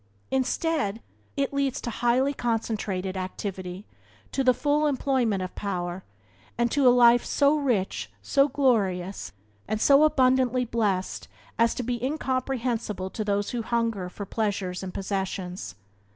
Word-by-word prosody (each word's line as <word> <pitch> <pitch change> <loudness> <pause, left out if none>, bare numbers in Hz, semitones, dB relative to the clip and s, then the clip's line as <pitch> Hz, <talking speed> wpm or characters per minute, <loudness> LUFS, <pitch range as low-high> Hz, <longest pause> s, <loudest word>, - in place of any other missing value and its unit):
Instead, 265 - 0 0.4
it 280 0 0
leads 275 -2 0
to 240 - -4
highly 245 +5 +2
concentrated 215 -6 -2
activity, 185 0 -5 0.5
to 270 - 0
the 255 - +6
full 295 +3 +1
employment 255 -8 +1
of 185 - -6
power, 180 -2 -4 0.5
and 235 -1 +1
to 275 -2 +3
a - - +10
life 240 -1 +6
so 285 +1 +3
rich, 195 - -1
so 275 - +3
glorious, 195 - 0 0.4
and 215 - -1
so 280 +5 +6
abundantly 255 -3 +3
blessed 210 -5 -1 0.3
as 230 0 +3
to 250 - -3
be 240 0 -3
incomprehensible 255 -8 -2
to 215 - -3
those 205 -1 -1
who 240 - -2
hunger 230 -5 -1
for 200 +2 -7
pleasures 195 -4 -2
and 190 -1 -5
possessions. 190 - -4
230 Hz, 135 wpm, -26 LUFS, 190-260 Hz, 0.5 s, a